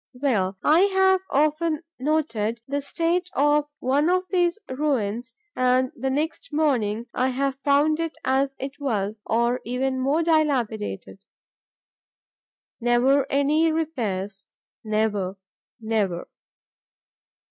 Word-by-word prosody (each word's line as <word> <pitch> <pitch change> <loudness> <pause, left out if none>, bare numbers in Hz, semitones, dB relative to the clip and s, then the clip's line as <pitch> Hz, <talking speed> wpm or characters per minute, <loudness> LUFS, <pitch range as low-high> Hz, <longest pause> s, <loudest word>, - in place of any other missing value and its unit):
Well, 210 -8 0
I 310 +3 +5 0.2
have 380 -1 +4
often 310 +3 +1 0.2
noted 250 -6 0
the 285 +1 -2
state 340 +5 -1
of 295 +1 +2
one 285 +5 +1
of 370 +1 +1
these 350 0 +2
ruins 255 -4 -2 0.2
and, 255 0 +2
the 265 +2 -2
next 310 - -2
morning, 240 -8 0
I 255 - +1
have 270 +1 -1
found 295 +3 +3
it 330 -1 -3
as 270 +1 +1
it 275 +2 -6
was, 215 -6 -2
or 235 +2 +1
even 260 +2 -1
more 280 +6 +1
dilapidated. 250 - 0 1.6
Never 255 +3 +3
any 300 +4 +3
repairs; 205 - -3 0.4
never; 210 -3 -1 0.4
never. 210 -6 -1
270 Hz, 110 wpm, -24 LUFS, 230-305 Hz, 1.6 s, I